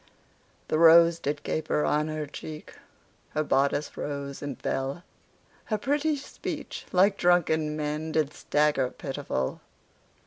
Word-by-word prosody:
The 155 Hz, -, +1 dB
rose 170 Hz, 0 st, +7 dB
did 145 Hz, -1 st, -3 dB
caper 155 Hz, -1 st, 0 dB
on 150 Hz, +1 st, +1 dB
her 155 Hz, -1 st, -3 dB
cheek, 150 Hz, +2 st, -9 dB, 0.6 s
Her 155 Hz, -, +2 dB
bodice 140 Hz, +1 st, +1 dB
rose 140 Hz, -1 st, -5 dB
and 140 Hz, -4 st, -5 dB
fell, 135 Hz, +6 st, -2 dB, 0.6 s
Her 215 Hz, -, -1 dB
pretty 295 Hz, +6 st, +1 dB
speech, 285 Hz, -, -6 dB
like 195 Hz, +2 st, +4 dB
drunken 160 Hz, -3 st, +2 dB
men, 150 Hz, +1 st, -3 dB
Did 155 Hz, -2 st, +1 dB
stagger 145 Hz, -3 st, +1 dB
pitiful. 135 Hz, -, -4 dB
150 Hz, 125 wpm, -27 LUFS, 145-170 Hz, 0.6 s, rose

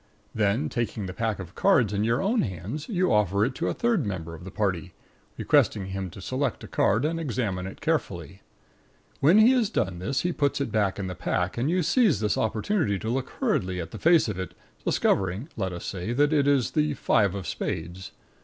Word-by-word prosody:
Then, 110 Hz, +7 st, +1 dB
taking 115 Hz, -6 st, -3 dB
the 95 Hz, -, -5 dB
pack 110 Hz, 0 st, -1 dB
of 95 Hz, -1 st, -9 dB
cards 120 Hz, -, +3 dB
in 100 Hz, +1 st, 0 dB
your 115 Hz, +4 st, +1 dB
own 220 Hz, +4 st, +2 dB
hands, 100 Hz, -, -5 dB
you 185 Hz, -4 st, +1 dB
offer 100 Hz, -1 st, +3 dB
it 130 Hz, -, -2 dB
to -, -, -2 dB
a -, -, 0 dB
third 235 Hz, -8 st, +1 dB
member 90 Hz, -6 st, -4 dB
of 85 Hz, +2 st, -10 dB
the -, -, -6 dB
party, 95 Hz, -4 st, -2 dB, 0.4 s
requesting 100 Hz, -3 st, +2 dB
him 95 Hz, 0 st, -4 dB
to 95 Hz, -, -11 dB
select 130 Hz, +2 st, -2 dB
a -, -, -7 dB
card 110 Hz, +8 st, +2 dB
and 165 Hz, +2 st, -1 dB
examine 115 Hz, -, -2 dB
it 95 Hz, -, -10 dB
carefully. 85 Hz, +3 st, -2 dB, 0.8 s
When 165 Hz, +9 st, +5 dB
he 220 Hz, +3 st, +7 dB
has 245 Hz, -6 st, +2 dB
done 95 Hz, -, -1 dB
this 135 Hz, +9 st, -1 dB
he 180 Hz, -, 0 dB
puts 145 Hz, -4 st, 0 dB
it 140 Hz, -, -2 dB
back 100 Hz, -4 st, +1 dB
in 100 Hz, -, -3 dB
the 90 Hz, -, -4 dB
pack, 90 Hz, +1 st, -1 dB
and 125 Hz, +5 st, 0 dB
you 180 Hz, +1 st, +1 dB
seize 210 Hz, -, +3 dB
this 105 Hz, -1 st, +1 dB
opportunity 110 Hz, -, 0 dB
to 110 Hz, -, -4 dB
look 130 Hz, +1 st, -2 dB
hurriedly 90 Hz, 0 st, 0 dB
at 85 Hz, -1 st, -6 dB
the -, -, -8 dB
face 165 Hz, -3 st, +4 dB
of 100 Hz, -4 st, -4 dB
it, 95 Hz, -3 st, -5 dB, 0.3 s
discovering 95 Hz, -, 0 dB
(let 95 Hz, -3 st, -2 dB
us 85 Hz, -1 st, -7 dB
say) 95 Hz, +5 st, -3 dB
that 145 Hz, +4 st, +3 dB
it 145 Hz, -2 st, +3 dB
is 140 Hz, -4 st, +2 dB
the 150 Hz, -2 st, +1 dB
five 100 Hz, -6 st, +2 dB
of 95 Hz, -3 st, -5 dB
spades. 85 Hz, +3 st, -4 dB
110 Hz, 215 wpm, -26 LUFS, 95-145 Hz, 0.8 s, he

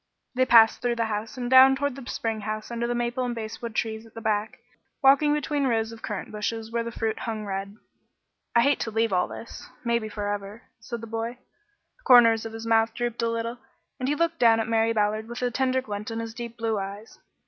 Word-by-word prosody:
They 255 Hz, 0 st, +2 dB
passed 225 Hz, -2 st, +6 dB
through 240 Hz, -1 st, 0 dB
the 230 Hz, -1 st, 0 dB
house 215 Hz, +3 st, -4 dB
and 245 Hz, -1 st, -3 dB
down 260 Hz, +1 st, +8 dB
toward 285 Hz, -1 st, -2 dB
the 270 Hz, -2 st, -9 dB
spring 225 Hz, -2 st, -2 dB
house 215 Hz, +2 st, -5 dB
under 235 Hz, 0 st, -2 dB
the 240 Hz, -, -1 dB
maple 240 Hz, +1 st, -1 dB
and 245 Hz, -1 st, -2 dB
basswood 225 Hz, 0 st, -6 dB
trees 220 Hz, -1 st, -2 dB
at 225 Hz, -, -18 dB
the -, -, -6 dB
back, 215 Hz, -1 st, -1 dB, 0.5 s
walking 280 Hz, +2 st, +6 dB
between 295 Hz, -1 st, 0 dB
rows 225 Hz, -2 st, 0 dB
of 225 Hz, 0 st, -11 dB
currant 210 Hz, -3 st, -5 dB
bushes 220 Hz, +1 st, -4 dB
where 235 Hz, 0 st, 0 dB
the 235 Hz, 0 st, -5 dB
fruit 225 Hz, -1 st, -2 dB
hung 220 Hz, -2 st, -4 dB
red. 195 Hz, 0 st, -4 dB, 0.8 s
"I 235 Hz, -, +6 dB
hate 280 Hz, +2 st, +3 dB
to -, -, -2 dB
leave 225 Hz, -1 st, 0 dB
all 180 Hz, 0 st, +2 dB
this 230 Hz, -, -9 dB
maybe 235 Hz, -2 st, 0 dB
forever," 205 Hz, +1 st, -4 dB, 0.2 s
said 235 Hz, +1 st, -6 dB
the -, -, -6 dB
boy. 225 Hz, +1 st, -3 dB, 0.6 s
The -, -, -30 dB
corners 230 Hz, -3 st, +6 dB
of 225 Hz, -, -10 dB
his 225 Hz, 0 st, -7 dB
mouth 225 Hz, 0 st, +2 dB
drooped 240 Hz, -1 st, -2 dB
a 230 Hz, -, +1 dB
little, 230 Hz, +1 st, -3 dB, 0.4 s
and 255 Hz, +1 st, -1 dB
he 295 Hz, -, +1 dB
looked 335 Hz, +1 st, 0 dB
down 225 Hz, -1 st, +5 dB
at 225 Hz, -, -1 dB
Mary 225 Hz, 0 st, +2 dB
Ballard 215 Hz, 0 st, 0 dB
with 240 Hz, +1 st, -6 dB
a 245 Hz, -, +1 dB
tender 260 Hz, +1 st, 0 dB
glint 210 Hz, -2 st, -5 dB
in 225 Hz, -, -4 dB
his 230 Hz, 0 st, -5 dB
deep 235 Hz, 0 st, -7 dB
blue 225 Hz, -2 st, -1 dB
eyes. 200 Hz, +3 st, -8 dB
230 Hz, 225 wpm, -26 LUFS, 220-240 Hz, 0.8 s, down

